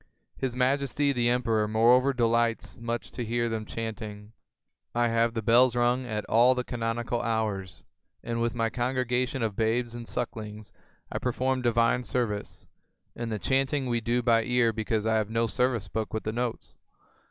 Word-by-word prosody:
His 130 -2 -3
Majesty 140 +2 +1
the 120 -2 +2
Emperor 115 -3 +1
moreover 120 +5 +4
delights 115 -2 +1
much 115 -1 -4
to 120 - -4
hear 120 +1 0
them 110 -1 -3
chanting. 110 -2 -6 0.6
I 120 0 +2
have 115 0 +1
the 115 - -2
bells 120 +3 +5
rung 120 +1 +1
at 105 -2 -3
all 120 +3 +5
the 125 - -1
canonical 120 0 -2
hours, 105 -6 -2 0.4
and 115 0 -2
with 120 +1 0
my 115 -1 0
congregation 125 +1 -1
of 110 -3 -1
babes 115 +2 0
and 120 -1 -7
sucklings, 110 -3 -5 0.4
I - - -2
perform 130 +1 0
divine 120 0 +2
service, 110 -5 -3 0.5
and 115 -1 -4
the 110 - -1
chanting 135 - 0
we 120 -2 0
do 120 +2 0
by 115 -1 +4
ear 125 -1 +2
because 110 0 -1
I 110 0 +2
have 110 -1 -1
no 115 +1 +1
service 120 -2 0
book 110 +2 -3
with 110 - -2
the 110 - -3
notes. 120 0 -4
115 Hz, 170 wpm, -28 LUFS, 110-125 Hz, 0.6 s, bells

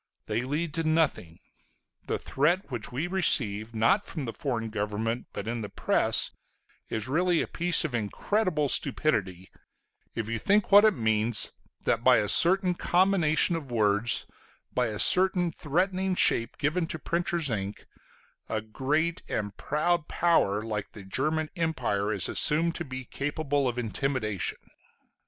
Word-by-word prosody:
They 110 +2 -1
lead 150 +5 -3
to 165 - -1
nothing. 155 - 0 0.7
The - - -1
threat 170 +5 0
which 120 -4 -5
we 135 +7 -2
receive, 115 - +2
not 115 - +3
from 155 -8 -5
the 115 - -5
foreign 115 -5 -3
government, 110 +3 -3
but 100 - -6
in 115 0 -3
the 105 - -6
press, - - +2 0.6
is 110 +1 -3
really 170 +4 +1
a - - -6
piece 175 -2 +1
of 150 - -4
incredible 150 - 0
stupidity, 105 - 0 0.6
if 110 - -3
you 115 0 -2
think 205 - +2
what 205 +2 +8
it 215 - +4
means 110 0 +1 0.3
that - - 0
by - - +6
a 105 - 0
certain 185 - +3
combination 175 -2 +2
of 150 -5 -6
words, 110 0 +1 0.5
by 125 -1 +1
a 105 -2 -4
certain 180 - +3
threatening 185 +5 -1
shape 115 -8 +2
given 165 +3 0
to 160 - -3
printer's 170 -2 -1
ink, 100 -1 -4 0.6
a 110 - -1
great 145 +10 -1
and 105 -1 -3
proud 160 +2 -1
power 110 -12 +1
like 105 -2 -5
the 105 - -10
German 155 +10 -1
Empire 125 - -1
is 100 -5 0
assumed 165 +3 +2
to 175 - -5
be 130 -3 -7
capable 145 +1 -2
of 125 -1 -3
intimidation. 115 -3 -2
140 Hz, 150 wpm, -27 LUFS, 110-170 Hz, 0.7 s, what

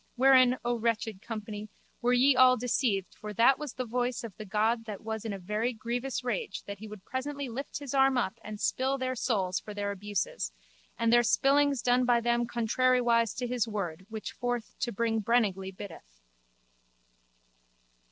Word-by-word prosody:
Wherein, 255 -1 +6
O 240 -1 0
wretched 225 -3 -1
company, 215 -2 -6 0.3
were 245 0 +2
ye 260 +2 +5
all 255 0 +6
deceived 225 -5 0
for 210 0 -8
that 240 +6 +5
was 300 -4 -5
the 255 - -4
voice 245 +1 -1
of 220 -5 -7
the 215 - -8
god 225 +3 +1
that 210 -3 -6
was 220 0 -4
in 220 - -2
a 200 - -4
very 210 +6 -2
grievous 240 +4 -3
rage 210 -5 -3
that 200 -1 -7
he 220 - -8
would 210 -3 -11
presently 280 +1 -4
lift 270 +4 -5
his 285 -2 -6
arm 270 -1 +4
up 230 -2 -1
and 210 -1 -7
spill 265 +5 0
their 255 -1 -1
souls 200 -7 0
for 210 - -9
their 205 0 -2
abuses 200 - -3 0.5
and 230 0 +2
their 240 - +7
spillings 275 +2 +3
done 250 +1 +3
by 245 -1 +4
them 240 0 +1
contrariwise 235 -1 +2
to 250 - -3
his 245 -1 0
word 190 -4 -4
which 220 +3 -5
forth 245 -3 -3
to 240 - -1
bring 225 +1 0
brenningly 205 -4 +1
biddeth. 165 - -11
235 Hz, 180 wpm, -29 LUFS, 210-250 Hz, 0.5 s, their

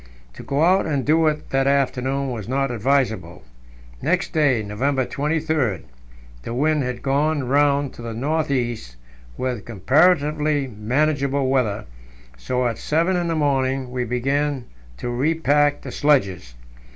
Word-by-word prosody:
To - - -10
go 140 +3 0
out 185 +3 +3
and 140 -4 -1
do 160 +2 +3
it 150 0 -2
that 135 0 +2
afternoon 135 0 0
was 110 -4 -6
not 135 +1 0
advisable. 110 -7 -1 0.6
Next 180 +2 0
day, 140 -8 +2
November 130 +6 -1
23, 150 - -1 0.6
the 115 - -5
wind 150 +3 +2
had 125 -2 -4
gone 140 0 +1
round 140 0 +2
to - - -11
the 115 -1 -6
north 155 +5 -1
east, 120 - -2 0.4
with 125 -5 -3
comparatively 150 - +2
manageable 135 +4 0
weather, 115 -6 0 0.5
so 125 - -2
at 115 -2 -3
seven 170 +5 +1
in 175 -1 0
the 165 - -1
morning 135 -3 0
we 125 0 -2
began 135 +2 -1 0.3
to 120 - -4
repack 145 +2 +2
the - - -7
sledges. 95 - +1
135 Hz, 140 wpm, -22 LUFS, 120-150 Hz, 0.6 s, out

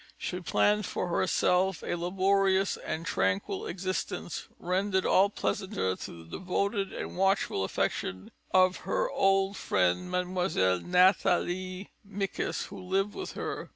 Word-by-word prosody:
She 180 - -4
planned 205 +3 +2
for 180 - -3
herself 185 +1 +1
a - - -2
laborious 190 +2 +2
and 160 +1 -5
tranquil 380 - -1
existence, 185 -2 -4
rendered 190 +2 0
all 195 +2 +5
the - - -26
pleasanter 190 - -1
through 85 -1 -9
the 80 - -8
devoted 200 +2 -1
and - - -6
watchful 195 - +1
affection 95 0 -2 0.2
of 185 0 +4
her - - -1
old 195 0 +2
friend, 95 - +1
Mlle. 180 - +1
Nathalie 185 - +2
Micas, 200 -1 -3
who - - -9
lived 195 +2 0
with 380 - -6
her. - - -5
185 Hz, 130 wpm, -29 LUFS, 180-195 Hz, 0.2 s, all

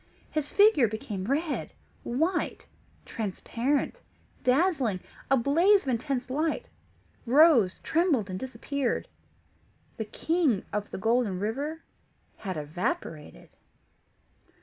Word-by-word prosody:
His 305 -2 -1
figure 405 - +5
became 215 -3 -5
red, 290 - -1 0.3
white, 320 +9 -1 0.4
transparent, 235 - -2 0.4
dazzling 260 - +2 0.3
a 270 - +5
blaze 335 - +4
of 270 - -3
intense 255 +1 -1
light 315 - -1 0.6
rose, 255 - +6
trembled, 315 - +2
and 185 -1 -5
disappeared. 260 0 -2 0.9
The 220 - -3
King 295 - 0
of 210 0 -2
the - - -6
Golden 225 -2 +1
River 280 +10 -3 0.5
had 185 -5 -5
evaporated. 155 - -4
260 Hz, 100 wpm, -28 LUFS, 215-315 Hz, 0.9 s, rose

